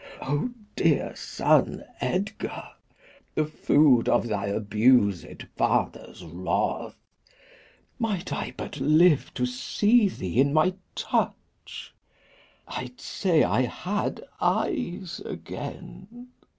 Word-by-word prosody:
Ah 145 - -1 0.3
dear - - +1
son - - +1 0.2
Edgar, 200 +4 -3 0.6
The 155 - +2
food 145 -4 +3
of 120 - +2
thy 100 -2 -2
abused 105 -1 +2
father's 90 - -1
wrath! 85 +3 -2 1.0
Might 205 -5 -2
I - - -4
but 150 - -6
live 155 +2 +4
to 125 - 0
see 205 - +2
thee 100 - 0
in 140 +1 +2
my 160 +4 +3 0.2
touch, - - -3 0.7
I'ld 125 -1 -6
say 175 -5 +1
I - - +2
had 190 +11 -2 0.2
eyes 180 -5 -1
again! 240 +6 -8
145 Hz, 100 wpm, -26 LUFS, 120-185 Hz, 1.0 s, live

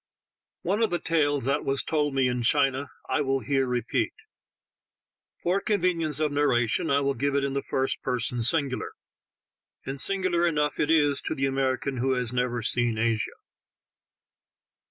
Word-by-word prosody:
One 200 +6 0
of 225 - +3
the 175 - 0
tales 145 -6 0
that 140 +2 0
was 135 0 +1
told 150 -3 -1
me 135 -1 +3
in 125 0 -1
China 135 +2 +2 0.2
I - - 0
will 135 -1 0
here 135 +3 0
repeat; 125 -2 -1 1.3
for 185 +3 +1
convenience 175 -7 +1
of 155 -1 0
narration 140 -1 +1
I 140 0 +3
will 140 0 +1
give 140 +3 -1
it 140 - +1
in 140 -1 -1
the 140 - -1
first 130 0 -2
person 125 0 -1
singular, 135 +2 0 0.9
and 135 0 -2
singular 185 -3 +2
enough 150 -3 0
it 150 - +1
is 145 -3 +3
to - - -3
the 135 - 0
American 135 0 -1
who 130 +2 +1
has 125 -1 -1
never 125 -1 -1
seen 120 0 +1
Asia. 110 -1 0
140 Hz, 160 wpm, -26 LUFS, 125-150 Hz, 1.3 s, of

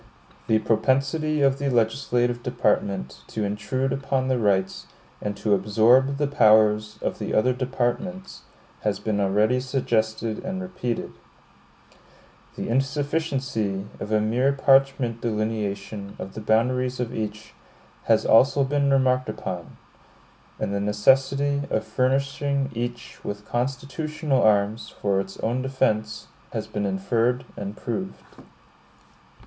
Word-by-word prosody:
The 110 - +4
propensity 135 +8 +1
of 135 0 +3
the 140 0 0
legislative 120 0 +1
department 105 - -1
to 110 - -3
intrude 120 +6 -1
upon 135 -1 -1
the 130 -1 +1
rights, 95 -3 0 0.3
and 105 -1 -3
to 105 - +1
absorb 120 +7 +4
the 145 - +1
powers, 110 -5 +4
of - - -2
the - - -2
other 125 +4 +3
departments, 135 +9 -3 0.4
has - - -1
been 105 -2 -1
already 105 +5 +2
suggested 115 -4 -1
and 185 0 -3
repeated; 155 -11 -4 1.4
the - - -4
insufficiency 135 -6 -1
of 105 - -6
a 110 - +3
mere 120 +6 +2
parchment 135 -4 +3
delineation 105 -2 -3
of 95 - -7
the 110 - -7
boundaries 125 +4 +1
of 125 -2 -2
each, 110 0 -5 0.5
has - - +3
also 135 +5 +5
been 140 +1 +1
remarked 130 -2 +2
upon; 90 -5 -6 0.8
and 100 - -2
the 100 - 0
necessity 135 +7 +2
of 110 - -1
furnishing 140 +1 0
each 120 0 -5
with 105 0 -5
constitutional 140 +3 -1
arms 105 +1 +2
for 100 -1 -1
its 95 0 -5
own 120 +3 0
defense, 130 -5 -1 0.3
has - - -3
been 105 -1 -3
inferred 115 +6 0
and 100 +1 -6
proved. 185 +10 -5
120 Hz, 125 wpm, -24 LUFS, 105-135 Hz, 1.4 s, also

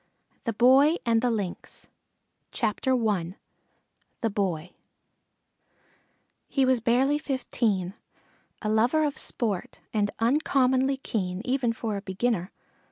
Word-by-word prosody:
THE 230 - -1
BOY 265 +8 +5
AND 230 -1 +3
THE 250 - +2
LYNX 205 -6 -5 0.8
I 215 -2 +3 1.5
THE 225 - +1
BOY 180 -4 -2 1.7
He 270 -2 +2
was 260 -1 +3
barely 255 +6 +2
fifteen, 230 - -1 0.7
a 215 - -1
lover 240 +9 +3
of 290 - -2
sport 210 -7 -2
and 205 -2 +1
uncommonly 265 +1 +2
keen, 190 -7 -3
even 255 -2 +1
for 225 -2 -3
a - - -5
beginner. 195 -1 -1
230 Hz, 105 wpm, -27 LUFS, 205-260 Hz, 1.7 s, BOY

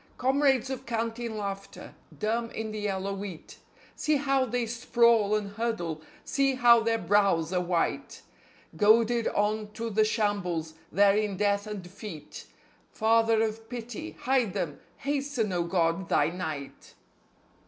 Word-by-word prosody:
Comrades 265 -1 +2
of 265 -1 -6
canteen 230 0 -3
laughter, 200 -1 -6 0.2
dumb 230 +2 -1
in 220 -1 -5
the 215 - -5
yellow 200 -1 -2
wheat. 195 -4 -8 0.4
See 305 0 +1
how 275 -2 +2
they 245 0 -1
sprawl 235 -2 +3
and 205 -1 -2
huddle! 200 -8 -3 0.2
See 275 -1 +1
how 240 -2 +6
their 225 0 +1
brows 195 -6 +2
are 180 - +2
white! 175 -1 -2 0.5
Goaded 230 +2 +4
on 210 +1 0
to 230 0 -4
the 215 +1 +3
shambles, 200 -7 -1 0.2
there 200 +2 +5
in 210 -2 0
death 200 +1 +1
and 210 -3 -5
defeat.... 180 -3 -9 0.4
Father 225 0 +3
of 225 0 -4
Pity, 245 +5 -7
hide 250 -6 +1
them! 150 -4 -3 0.2
Hasten, 275 -7 -1
O 175 -1 0
God, 170 0 0
Thy 145 +1 +3
night! 155 -6 -6
215 Hz, 140 wpm, -28 LUFS, 195-235 Hz, 0.5 s, how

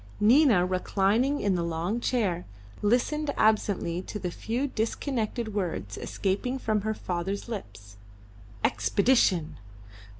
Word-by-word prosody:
Nina, 225 - +5
reclining 200 +8 +1
in 200 -1 +2
the 175 - 0
long 170 +6 -1
chair, 205 -9 -1 0.3
listened 255 +8 +1
absently 205 -5 +2
to 210 - -6
the 180 -3 -4
few 235 +9 -2
disconnected 230 -2 -2
words 170 - -3
escaping 205 +7 -2
from 215 -5 0
her 220 +1 -2
father's 185 +4 -3
lips. 100 - -8 0.7
Expedition! 170 - +2
205 Hz, 110 wpm, -27 LUFS, 175-235 Hz, 0.7 s, Nina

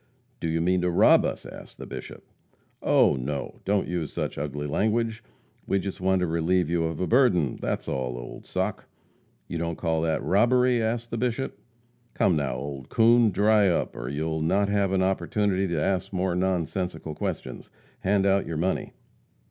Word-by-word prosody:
"Do 85 - -2
you 80 +1 0
mean 90 +1 +2
to 90 - +1
rob 85 - +5
us?" - - -3
asked - - -11
the - - -8
Bishop. - - -8 0.6
"Oh, - - +4
no! 70 +3 -4
Don't 100 0 +1
use 85 -3 -3
such - - -3
ugly 75 0 -4
language. 110 +7 0 0.4
We 100 - +2
just 95 0 -4
want 95 0 +2
to - - +2
relieve 85 +1 +1
you 85 -1 +1
of 80 -1 -3
a 90 - 0
burden 100 - +3
that's - - -2
all, 65 -2 -2
old - - -9
sock." 95 +2 -2 0.6
"You 85 - -4
don't 85 -1 -2
call 80 -1 0
that 80 -1 0
robbery?" 120 +4 +3
asked 115 +1 -2
the 115 - -2
Bishop. 125 +2 -2 0.6
"Come, 90 - +3
now, 70 -4 -1
old 70 0 -6
coon! 115 0 +5
Dry 105 0 +4
up, 85 - -1
or - - -5
you'll 80 +2 -2
not 95 +5 +2
have 100 -2 +1
an 95 -1 +2
opportunity 95 +1 0
to 85 -3 -1
ask 95 +3 -1
any 95 - -3
more 90 0 0
nonsensical 90 -2 -2
questions. - - -5 0.3
Hand 100 0 +1
out 100 0 +2
your 80 - -3
money!" 90 +4 -1
90 Hz, 180 wpm, -26 LUFS, 80-100 Hz, 0.6 s, rob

